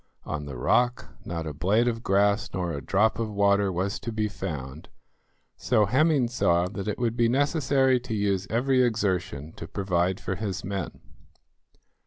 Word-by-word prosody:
On 75 -1 -4
the 70 -3 -6
rock 120 - +1 0.2
not 85 -1 -4
a 75 - -4
blade 100 +11 +2
of 115 -1 -1
grass 100 +1 +2
nor 90 -2 -2
a 70 - -4
drop 110 +7 +1
of 115 -1 -1
water 100 -1 +2
was 95 +3 -2
to 115 - -5
be 110 -1 -1
found, 75 -8 -6 0.7
so 110 -4 +2
Hemming 135 - +3
saw 90 -7 +1
that 100 0 -6
it 105 - -2
would 120 -2 -1
be 120 -1 +2
necessary 135 -1 +2
to 120 -2 -5
use 100 -2 0
every 130 +3 +2
exertion 95 - -1
to 80 - -7
provide 95 -1 0
for 95 - -3
his 95 -1 -4
men. 95 -2 -5
100 Hz, 170 wpm, -26 LUFS, 90-120 Hz, 0.7 s, Hemming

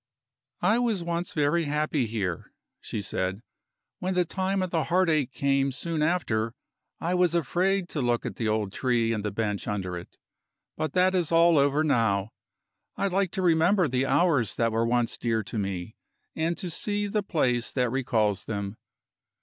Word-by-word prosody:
"I 225 +3 +4
was 225 -7 0
once 170 +1 -2
very 155 +2 +1
happy 150 -3 0
here," 100 -6 -3 0.3
she 105 - -5
said. 95 +2 -2 0.6
"When 185 0 -2
the 180 -1 +3
time 190 +2 -1
of 185 - -4
the 160 -4 0
heartache 160 -5 +2
came 140 0 +1
soon 155 +5 -3
after, 120 -9 0 0.4
I 170 +2 -1
was 180 -2 +2
afraid 180 +4 +1
to 150 - -2
look 120 -1 0
at - - -5
the 115 - -1
old 105 -2 -1
tree 120 -3 +1
and 105 -2 -3
the 105 - -1
bench 105 -1 -2
under 95 -3 -2
it. 85 - -9 0.6
But 155 - -3
that 185 0 +3
is 175 -4 0
all 165 -1 +5
over 140 +2 +3
now. 110 -8 +1 0.7
I 200 - +1
like 190 0 +1
to 190 - -2
remember 175 +2 +4
the 130 0 0
hours 145 - +2
that 115 -1 +1
were 115 +1 +1
once 120 -1 0
dear 115 -2 0
to 110 - -4
me, 95 +1 -4 0.4
and 165 +2 -1
to 180 - -4
see 205 +5 -2
the 210 +1 0
place 125 -11 0
that 125 -3 0
recalls 110 -7 0
them. 100 -1 -4
140 Hz, 175 wpm, -27 LUFS, 115-175 Hz, 0.7 s, all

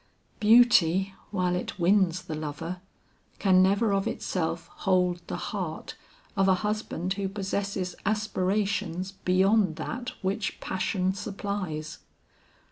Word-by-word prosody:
Beauty, 200 -5 +5 0.2
while 185 -3 0
it 180 - -4
wins 185 -1 +3
the 160 - -6
lover, 155 +4 -5 0.6
can 185 -2 +4
never 200 +3 +3
of 195 0 +1
itself 165 -2 -2
hold 180 -2 +1
the - - -3
heart 175 -2 -4 0.4
of 195 -1 +3
a 190 - +5
husband 210 -4 -2
who 195 -1 -2
possesses 195 -2 -2
aspirations 195 -3 -1
beyond 190 -1 +2
that 240 +10 -5
which 195 +2 -2
passion 190 0 -1
supplies. 195 -6 -4
190 Hz, 115 wpm, -27 LUFS, 180-200 Hz, 0.6 s, Beauty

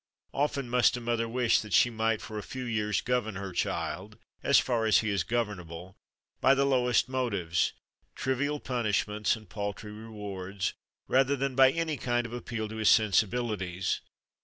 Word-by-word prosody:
Often 140 -2 -1
must 125 0 +3
a - - -4
mother 115 -1 -1
wish 120 0 +3
that 105 -4 -6
she 120 +8 +5
might 110 -1 0
for 110 -1 -5
a - - -4
few 130 +8 -6
years 105 -3 0
govern 120 -4 -1
her 95 0 -5
child 85 - -3 0.2
(as - - +4
far 115 -3 +2
as 110 - +6
he 110 - -2
is 100 -5 +1
governable) 95 -6 -4 0.4
by 135 - +5
the 140 0 +2
lowest 125 -3 +2
motives 100 -10 0 0.4
trivial 145 +3 -1
punishments 105 -4 0
and 110 -2 -13
paltry 105 +2 -5
rewards 100 -3 -5 0.3
rather 135 +2 +3
than 135 0 -1
by 130 +1 +7
any 160 +1 -1
kind 120 -1 0
of 115 - -7
appeal 115 -2 -4
to 110 - -7
his 110 -1 +3
sensibilities. 105 -3 +1
115 Hz, 165 wpm, -29 LUFS, 105-125 Hz, 0.4 s, by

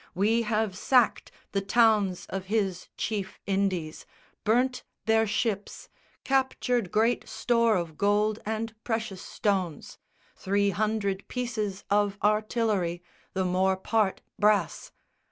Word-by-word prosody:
We 215 +5 +2
have 215 -3 0
sacked 245 +3 +2 0.2
The 195 - 0
towns 205 -3 +3
of 195 0 -4
his 195 -3 -1
chief 205 -4 -3
Indies, 190 -5 -1 0.4
burnt 250 +3 +2 0.2
their 220 0 +3
ships, 210 -1 -2 0.3
Captured 255 -5 0
great 225 +3 +1
store 230 -2 +2
of 170 -4 -3
gold 210 +1 +2
and 220 +1 -3
precious 220 -5 -3
stones, 185 -7 -2 0.4
Three 200 +1 +1
hundred 200 0 -1
pieces 220 -6 -3
of 205 -1 +2
artillery, 210 -5 +1 0.3
The 190 0 0
more 185 +1 +2
part 210 0 0 0.2
brass. 210 0 +2
210 Hz, 115 wpm, -27 LUFS, 190-225 Hz, 0.4 s, towns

